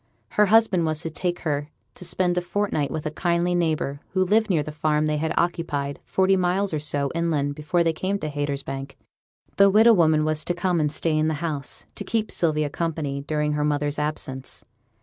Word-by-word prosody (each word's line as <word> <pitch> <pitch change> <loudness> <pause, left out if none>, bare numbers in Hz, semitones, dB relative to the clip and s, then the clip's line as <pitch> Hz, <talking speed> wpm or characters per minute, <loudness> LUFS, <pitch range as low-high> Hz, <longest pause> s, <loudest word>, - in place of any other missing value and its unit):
Her 210 0 +3
husband 215 -4 +4
was 155 0 0
to 165 - -4
take 175 +2 -3
her 145 -2 -2 0.2
to - - -10
spend 180 0 0
a 180 - +1
fortnight 175 -5 -1
with 155 -1 -4
a 155 - -1
kindly 175 +2 0
neighbour, 155 -5 0
who 185 -1 +2
lived 215 +3 +2
near 165 -6 +2
the 155 - -6
farm 150 0 +1
they 155 0 0
had 160 +1 -1
occupied, 145 -5 -1
forty 190 0 +2
miles 185 +1 0
or 155 - 0
so 145 -1 -1
inland, 160 -4 0
before 155 +4 0
they 165 -1 +1
came 190 +5 -1
to 155 - -4
Haytersbank. 140 -2 -4 0.6
The 200 0 +7
widow 220 +4 +6
woman 155 -5 +3
was 155 0 0
to 175 - -1
come 175 -1 0
and 150 -1 +1
stay 155 +1 0
in 155 0 +2
the 160 - 0
house, 150 -3 -4
to - - -5
keep 220 -2 -1
Sylvia 155 -3 +1
company, 155 -4 -2
during 150 +1 -1
her 150 0 0
mother's 145 0 0
absence. 135 -3 -3
155 Hz, 205 wpm, -24 LUFS, 150-180 Hz, 0.6 s, The